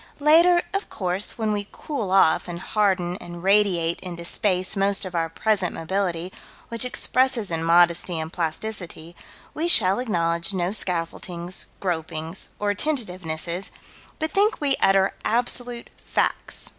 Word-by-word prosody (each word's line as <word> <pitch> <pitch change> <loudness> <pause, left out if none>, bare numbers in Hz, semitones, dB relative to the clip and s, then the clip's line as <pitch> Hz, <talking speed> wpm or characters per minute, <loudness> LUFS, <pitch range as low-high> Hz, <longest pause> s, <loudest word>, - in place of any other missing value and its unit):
Later, 335 +4 +5
of 395 +1 -2
course, 185 +1 -2
when 220 -2 0
we 205 -1 -2
cool 275 -10 -4
off 190 -4 +4
and 175 -1 -5
harden 185 -2 0
and 175 0 -10
radiate 190 -4 +2
into 170 -2 -7
space 185 +1 +2
most 195 0 +2
of 185 - -7
our 165 -1 -1
present 195 +1 0
mobility, 180 0 -2 0.4
which 230 +1 -1
expresses 250 -4 +1
in 165 0 -2
modesty 170 +1 +3
and 160 +1 -5
plasticity, 170 -1 -5 0.4
we 325 +3 -1
shall 200 - +5
acknowledge 170 -5 -1
no 180 0 0
scaffoldings, 175 -2 -3
gropings 165 -1 -4
or 205 0 0
tentativenesses, 185 - -2 0.5
but 315 0 -2
think 415 +3 +2
we 285 -2 +2
utter 195 0 +4
absolute 240 +1 -1
facts. - - +1
190 Hz, 135 wpm, -24 LUFS, 170-220 Hz, 0.5 s, Later